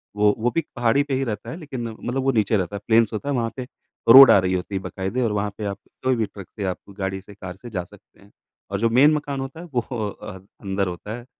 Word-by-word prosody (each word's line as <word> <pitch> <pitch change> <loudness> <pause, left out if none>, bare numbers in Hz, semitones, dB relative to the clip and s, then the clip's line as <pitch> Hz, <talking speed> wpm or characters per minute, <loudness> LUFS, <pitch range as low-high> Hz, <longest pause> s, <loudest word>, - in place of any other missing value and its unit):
वो 105 0 +4
वो 120 +3 +1
भी 165 - +3
पहाड़ी 120 +3 +2
पे 140 -2 -4
ही 135 - 0
रहता 110 -5 -4
है 160 - -6
लेकिन 130 -8 -6
मतलब 125 +4 -4
वो 135 - +3
नीचे 110 -2 +2
रहता 95 +2 -3
है, 100 - -4
प्लेन्स 115 -1 +4
होता 140 +7 -3
है, 140 - 0
वहाँ 115 -1 -1
पे 125 -1 -6 0.4
रोड 135 +3 +11
आ - - +7
रही 95 0 0
होती 95 +2 -3
है 95 - -1
बकायदे 95 +8 -3
और 115 -3 +1
वहाँ 105 0 -1
पे 105 - -4
आप 100 -1 -3 0.3
कोई 130 -1 +2
भी 115 - 0
ट्रक 100 -2 -11
से 105 - -5
आप 90 - -2 0.2
गाड़ी 95 0 -2
से, 100 - -14
कार 95 -2 -8
से 120 +5 -11
जा 95 -5 -3
सकते 100 +2 -20
हैं। 100 - -20 0.4
और 100 - -1
जो 115 - +2
मेन 140 +6 +5
मकान 145 -2 -2
होता 135 +4 -6
है 175 - -8
वो 120 - +2 0.3
अ, 95 -1 -9 0.2
अंदर 100 -1 -1
होता 105 +6 -6
है, 120 - -11
110 Hz, 275 wpm, -23 LUFS, 100-130 Hz, 0.4 s, रोड